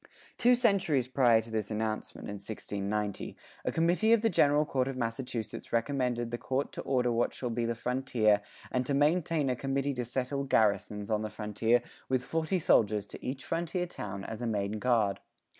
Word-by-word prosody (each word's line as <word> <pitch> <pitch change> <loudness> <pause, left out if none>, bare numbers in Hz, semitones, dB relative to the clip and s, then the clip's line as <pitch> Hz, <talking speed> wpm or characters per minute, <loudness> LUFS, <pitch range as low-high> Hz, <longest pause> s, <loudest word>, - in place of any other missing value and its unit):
Two 245 +1 +6
centuries 190 - +2
prior 125 -4 +4
to 115 +1 -11
this 110 -2 -2
announcement, 110 0 -3
in 105 - -5
1690, 100 0 -3 0.3
a - - 0
committee 175 +7 +3
of 230 -1 +3
the 225 - +3
General 150 -2 +4
Court 130 -3 0
of 135 -1 -4
Massachusetts 115 -1 -4
recommended 120 -1 0
the 120 - -3
Court 135 +2 -1
to - - -6
order 125 -2 +1
what 120 +1 0
shall 125 -2 -3
be 115 0 -1
the 115 0 -1
frontier 115 -4 +2 0.3
and 125 - +1
to 140 - +1
maintain 155 +1 +2
a 130 - +1
committee 135 +2 -1
to 125 -1 -2
settle 130 +3 -2
garrisons 105 -4 +1
on 105 -1 +1
the 110 - -3
frontier 110 +3 +1 0.3
with 130 -1 +1
forty 165 +3 0
soldiers 105 - +3
to - - -11
each 130 0 -4
frontier 170 +5 -1
town 100 - -6
as 110 +3 -6
a 120 - -1
main 105 -1 -1
guard. 110 -5 +2
125 Hz, 185 wpm, -30 LUFS, 110-140 Hz, 0.3 s, Two